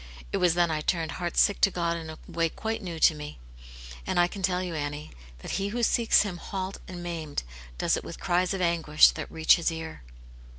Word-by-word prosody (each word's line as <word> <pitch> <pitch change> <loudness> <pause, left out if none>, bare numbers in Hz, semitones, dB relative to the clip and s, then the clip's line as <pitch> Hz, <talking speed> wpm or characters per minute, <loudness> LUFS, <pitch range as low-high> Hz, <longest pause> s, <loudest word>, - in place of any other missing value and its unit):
It - - +2
was 175 -2 +3
then 175 -1 +2
I 155 -1 -1
turned 165 0 -1
heart 175 -1 -4
sick 205 - +4
to 195 - +6
God 170 -2 -1
in 165 -1 -6
a 155 - -8
way 165 -1 0
quite 225 +6 -4
new 175 -4 -5
to - - +6
me; 150 -1 -8 0.7
and - - +1
I 175 - +5
can 195 +2 -8
tell 185 -1 +1
you, 180 -2 -4
Annie, 145 -1 -4 0.3
that - - -5
he 195 - 0
who 235 +4 -3
seeks 230 -1 +4
Him 195 -4 -5
halt 190 +2 -5
and 180 -1 -7
maimed 160 -4 -4 0.3
does - - +2
it - - -4
with - - -8
cries 180 -1 +1
of 190 - -3
anguish 165 -3 +5
that - - -7
reach 160 +2 +5
His 170 0 0
ear." 160 - -7
175 Hz, 225 wpm, -27 LUFS, 160-185 Hz, 0.7 s, to